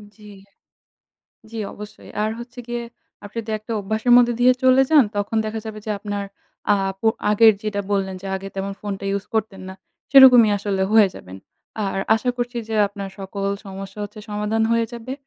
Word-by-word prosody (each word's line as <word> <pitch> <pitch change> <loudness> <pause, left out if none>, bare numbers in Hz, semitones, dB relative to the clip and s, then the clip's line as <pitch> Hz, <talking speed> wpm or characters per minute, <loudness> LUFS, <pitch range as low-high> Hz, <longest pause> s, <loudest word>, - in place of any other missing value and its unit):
জি। 215 - -19 1.3
জি, 230 - -9 0.2
অবশ্যই 210 0 -11
আর 215 - 0
হচ্ছে 240 +1 -11
গিয়ে 240 0 -3 0.4
আপনি 205 +3 -8
তো - - -5
একটা 215 +2 -8
অভ্যাসের 220 +4 0
মধ্যে 240 -1 +5
দিয়ে 250 +1 +6
চলে 260 +1 +5
যান। 300 -4 +7
তখন 205 +2 -2
দেখা 220 0 -4
যাবে 215 -1 -6
যে - - -3
আপনার 205 -1 -4 0.5
আপ 195 -1 -1
অ - - +7 0.2
আগের 220 +1 +6
যেটা 210 -1 -2
বললেন 190 -1 -1
যে - - -7
আগে 195 +1 -7
তেমন 195 +1 -3
ফোনটা 200 -1 -5
ইউজ 200 -1 -2
করতেন 205 -3 -2
না। 190 - -8 0.4
সেরকমই 250 -5 +8
আসলে 195 -1 -1
হয়ে 215 -3 +6
যাবেন। 95 +1 -11 0.5
আর 195 0 -2 0.2
আশা 235 +3 0
করছি 245 0 -3
যে 220 - -3
আপনার 200 -1 -7
সকল 195 +1 -5 0.2
সমস্যা 195 +1 -9
হচ্ছে 210 +1 -11
সমাধান 210 +2 -1
হয়ে 230 0 +2
যাবে। 240 +2 -7
210 Hz, 180 wpm, -21 LUFS, 195-230 Hz, 1.3 s, সেরকমই